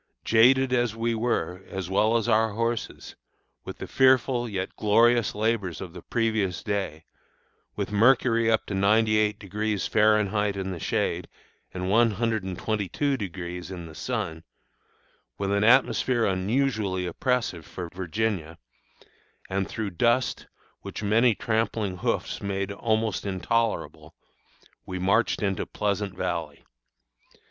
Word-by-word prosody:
Jaded 130 Hz, +3 st, +4 dB
as 120 Hz, -3 st, +1 dB
we 115 Hz, +1 st, 0 dB
were, 110 Hz, -5 st, -1 dB
as 95 Hz, -2 st, -4 dB
well 110 Hz, +5 st, +2 dB
as 115 Hz, -, -2 dB
our 110 Hz, -1 st, +3 dB
horses, 115 Hz, +1 st, -3 dB, 0.5 s
with -, -, -8 dB
the -, -, -6 dB
fearful 130 Hz, -2 st, +3 dB
yet 95 Hz, -2 st, -4 dB
glorious 115 Hz, +2 st, +3 dB
labors 105 Hz, -6 st, -1 dB
of 90 Hz, -3 st, -8 dB
the 90 Hz, -, -9 dB
previous 110 Hz, -6 st, -1 dB
day, 95 Hz, -6 st, -3 dB, 0.7 s
with -, -, -3 dB
mercury 115 Hz, +1 st, +4 dB
up 110 Hz, -1 st, +2 dB
to -, -, -5 dB
98° 105 Hz, 0 st, +1 dB
Fahrenheit 105 Hz, -1 st, +2 dB
in 95 Hz, 0 st, -3 dB
the 90 Hz, -, -5 dB
shade, -, -, -1 dB, 0.4 s
and 90 Hz, -, -5 dB
122° 100 Hz, -, -1 dB
in 90 Hz, -2 st, -7 dB
the 80 Hz, -, -11 dB
sun, 80 Hz, +1 st, -4 dB, 0.9 s
with 100 Hz, 0 st, -2 dB
an 100 Hz, +1 st, +2 dB
atmosphere 125 Hz, 0 st, +3 dB
unusually 100 Hz, -1 st, 0 dB
oppressive 120 Hz, -4 st, -1 dB
for 90 Hz, +3 st, -7 dB
Virginia, 90 Hz, -2 st, -2 dB, 0.9 s
and 95 Hz, 0 st, -1 dB
through 110 Hz, -3 st, -4 dB
dust 120 Hz, +8 st, +1 dB, 0.3 s
which -, -, -7 dB
many 110 Hz, +3 st, +3 dB
tramping 110 Hz, -4 st, -1 dB
hoofs -, -, -2 dB
made 100 Hz, 0 st, -2 dB
almost 110 Hz, 0 st, -1 dB
intolerable, 105 Hz, +4 st, -2 dB, 0.7 s
we 95 Hz, -, -6 dB
marched 100 Hz, +5 st, +1 dB
into 95 Hz, -2 st, -1 dB
Pleasant 100 Hz, -2 st, -2 dB
Valley. 85 Hz, -6 st, -4 dB
105 Hz, 120 wpm, -26 LUFS, 95-115 Hz, 0.9 s, Jaded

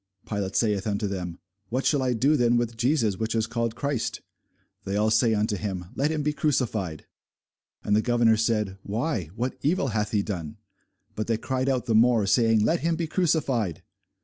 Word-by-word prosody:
Pilate 100 Hz, -3 st, -3 dB
saith 105 Hz, -3 st, +1 dB
unto 105 Hz, 0 st, -1 dB
them, 90 Hz, -4 st, -4 dB, 0.3 s
What 130 Hz, +3 st, -1 dB
shall 145 Hz, -3 st, +3 dB
I 130 Hz, -1 st, +1 dB
do 135 Hz, +7 st, +3 dB
then 120 Hz, -3 st, +3 dB
with 120 Hz, -1 st, -1 dB
Jesus 115 Hz, -4 st, +1 dB
which 115 Hz, +1 st, -1 dB
is 110 Hz, -1 st, +1 dB
called 115 Hz, 0 st, -2 dB
Christ? 140 Hz, -3 st, -2 dB, 0.6 s
They 95 Hz, -, -3 dB
all 105 Hz, +1 st, +2 dB
say 110 Hz, 0 st, +3 dB
unto 105 Hz, +1 st, 0 dB
him, 95 Hz, -3 st, -4 dB
Let 145 Hz, +2 st, 0 dB
him 155 Hz, -2 st, -1 dB
be 150 Hz, +1 st, 0 dB
crucified. 110 Hz, -, -1 dB, 0.8 s
And 105 Hz, -, +2 dB
the 110 Hz, -, +4 dB
governor 120 Hz, -1 st, +3 dB
said, 105 Hz, -3 st, 0 dB
Why, 110 Hz, -, -2 dB
what 125 Hz, +3 st, -3 dB
evil 150 Hz, -2 st, +1 dB
hath 105 Hz, -1 st, -1 dB
he 105 Hz, -2 st, +1 dB
done? 85 Hz, -7 st, -5 dB, 0.6 s
But 110 Hz, -, -3 dB
they 115 Hz, -1 st, +1 dB
cried 130 Hz, +3 st, -1 dB
out 130 Hz, -2 st, 0 dB
the 115 Hz, -, 0 dB
more, 115 Hz, -1 st, +4 dB
saying, 115 Hz, +1 st, +3 dB
Let 170 Hz, -, +2 dB
him 165 Hz, 0 st, 0 dB
be 165 Hz, 0 st, -2 dB
crucified. 150 Hz, -, 0 dB
115 Hz, 190 wpm, -26 LUFS, 105-130 Hz, 0.8 s, the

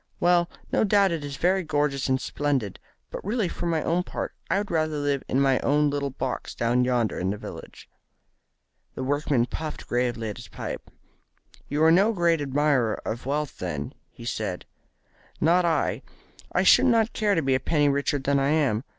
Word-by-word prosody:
"Well, 175 Hz, -1 st, +3 dB, 0.2 s
no -, -, +2 dB
doubt 200 Hz, -2 st, +4 dB
it 165 Hz, -3 st, -3 dB
is 145 Hz, -1 st, -6 dB
very 190 Hz, +2 st, +2 dB
gorgeous 145 Hz, -4 st, -1 dB
and 130 Hz, 0 st, +2 dB
splendid, 135 Hz, -7 st, -2 dB, 0.3 s
but -, -, -6 dB
really 210 Hz, 0 st, 0 dB
for 175 Hz, -, -4 dB
my 160 Hz, -2 st, 0 dB
own 170 Hz, +2 st, +1 dB
part -, -, -5 dB, 0.2 s
I 185 Hz, -, +2 dB
would 205 Hz, 0 st, -3 dB
rather 155 Hz, -2 st, 0 dB
live 145 Hz, -2 st, -1 dB
in 130 Hz, -, +1 dB
my 135 Hz, -2 st, +3 dB
own 145 Hz, 0 st, +2 dB
little 140 Hz, -1 st, -1 dB
box 130 Hz, -1 st, -4 dB
down 120 Hz, +2 st, +2 dB
yonder 125 Hz, -3 st, 0 dB
in 90 Hz, -, -1 dB
the 105 Hz, -, -2 dB
village." -, -, -10 dB, 1.1 s
The 130 Hz, -, -4 dB
workman 140 Hz, -2 st, +1 dB
puffed 155 Hz, +4 st, -6 dB
gravely 120 Hz, -2 st, -1 dB
at 105 Hz, -, -6 dB
his -, -, -10 dB
pipe. -, -, -7 dB, 0.8 s
"You 150 Hz, +2 st, +1 dB
are 160 Hz, -, +6 dB
no 200 Hz, +7 st, +4 dB
great 170 Hz, -4 st, +2 dB
admirer 140 Hz, -5 st, +1 dB
of 115 Hz, +3 st, -4 dB
wealth, 150 Hz, +1 st, -2 dB
then?" -, -, -4 dB, 0.2 s
he 115 Hz, -, -12 dB
said. 105 Hz, -6 st, -3 dB, 0.7 s
"Not 175 Hz, +3 st, +3 dB
I. 165 Hz, -2 st, 0 dB, 0.5 s
I -, -, +2 dB
should -, -, +6 dB
not 230 Hz, -2 st, +3 dB
care 210 Hz, -2 st, +1 dB
to 165 Hz, -, +1 dB
be 135 Hz, 0 st, +2 dB
a 130 Hz, -, +2 dB
penny 145 Hz, +2 st, +2 dB
richer 140 Hz, +1 st, +1 dB
than 140 Hz, +1 st, +1 dB
I 135 Hz, +1 st, +1 dB
am. 140 Hz, -8 st, +1 dB
145 Hz, 190 wpm, -25 LUFS, 130-170 Hz, 1.1 s, are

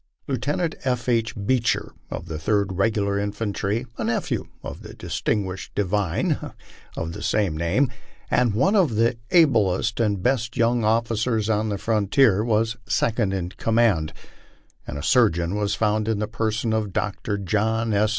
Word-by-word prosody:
Lieutenant 145 Hz, +6 st, -1 dB
F. 125 Hz, -3 st, -1 dB
H. 115 Hz, -2 st, +1 dB
Bcecher, 115 Hz, +3 st, 0 dB, 0.2 s
of -, -, -5 dB
the 80 Hz, -3 st, -5 dB
Third 100 Hz, +3 st, +1 dB
Regular 100 Hz, 0 st, +1 dB
Infantry, 105 Hz, +2 st, -2 dB
a -, -, -1 dB
nephew 115 Hz, +1 st, -1 dB, 0.2 s
of -, -, -7 dB
the -, -, -10 dB
distinguished 95 Hz, -3 st, -3 dB
divine 100 Hz, -2 st, 0 dB, 0.6 s
of 80 Hz, 0 st, -3 dB
the -, -, -7 dB
same 100 Hz, -7 st, +1 dB
name, 95 Hz, -, +1 dB, 0.4 s
and 120 Hz, -4 st, +2 dB
one 190 Hz, -, +3 dB
of 170 Hz, -, +3 dB
the 115 Hz, +2 st, +2 dB
ablest 115 Hz, -, +3 dB
and 105 Hz, -5 st, 0 dB
best 120 Hz, -2 st, 0 dB
young 120 Hz, 0 st, +2 dB
officers 110 Hz, 0 st, +1 dB
on 110 Hz, 0 st, 0 dB
the 100 Hz, -, -1 dB
frontier, 105 Hz, +1 st, +3 dB
was 115 Hz, 0 st, +1 dB
second 110 Hz, -3 st, +1 dB
in 90 Hz, -2 st, -2 dB
command; 110 Hz, -7 st, +1 dB, 0.8 s
and 70 Hz, -, -5 dB
a 70 Hz, -, -6 dB
surgeon 90 Hz, -7 st, +3 dB
was 105 Hz, -1 st, 0 dB
found 110 Hz, 0 st, +1 dB
in 110 Hz, -2 st, +1 dB
the 105 Hz, +1 st, -2 dB
person 110 Hz, 0 st, -1 dB
of 105 Hz, -4 st, -1 dB
Dr. 100 Hz, +1 st, -2 dB
John 110 Hz, +3 st, 0 dB
S. 105 Hz, +1 st, +3 dB
110 Hz, 155 wpm, -24 LUFS, 100-115 Hz, 0.8 s, one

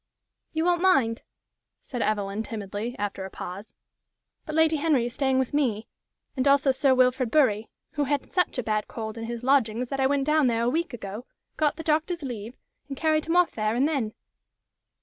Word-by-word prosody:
"You 320 Hz, +1 st, -1 dB
won't 350 Hz, -1 st, +2 dB
mind," 270 Hz, -12 st, +3 dB, 0.6 s
said 245 Hz, -3 st, -5 dB
Evelyn, 205 Hz, -1 st, -1 dB
timidly, 215 Hz, +2 st, -5 dB
after 205 Hz, -1 st, -3 dB
a 190 Hz, -, -6 dB
pause; 190 Hz, +3 st, -8 dB, 0.7 s
"but 310 Hz, -, -4 dB
Lady 320 Hz, 0 st, +4 dB
Henry 290 Hz, -5 st, +2 dB
is 240 Hz, -, -4 dB
staying 265 Hz, -1 st, +1 dB
with 260 Hz, 0 st, 0 dB
me, 240 Hz, -7 st, 0 dB, 0.5 s
and 260 Hz, 0 st, 0 dB
also 280 Hz, 0 st, +5 dB
Sir 265 Hz, 0 st, +3 dB
Wilfrid 255 Hz, -1 st, +3 dB
Bury, 225 Hz, -7 st, +2 dB, 0.2 s
who 295 Hz, -2 st, -1 dB
had 285 Hz, 0 st, -2 dB
such 360 Hz, -6 st, +1 dB
a 250 Hz, -, -1 dB
bad 215 Hz, -1 st, -1 dB
cold 220 Hz, -2 st, -6 dB
in 225 Hz, -1 st, -5 dB
his 235 Hz, +1 st, -5 dB
lodgings 250 Hz, -3 st, +2 dB
that 275 Hz, -, -3 dB
I 265 Hz, -, +4 dB
went 275 Hz, 0 st, +1 dB
down 305 Hz, -2 st, +3 dB
there 230 Hz, -1 st, +1 dB
a 235 Hz, -, +2 dB
week 335 Hz, +3 st, -1 dB
ago, 215 Hz, +2 st, -7 dB, 0.3 s
got 300 Hz, -2 st, +1 dB
the 325 Hz, -, -7 dB
doctor's 320 Hz, +2 st, 0 dB
leave, 235 Hz, -2 st, -6 dB, 0.3 s
and 275 Hz, -2 st, -6 dB
carried 310 Hz, 0 st, +1 dB
him 330 Hz, +2 st, 0 dB
off 355 Hz, -1 st, +4 dB
there 215 Hz, 0 st, -1 dB
and 265 Hz, +4 st, +3 dB
then. 260 Hz, -9 st, -2 dB
260 Hz, 195 wpm, -26 LUFS, 225-300 Hz, 0.7 s, also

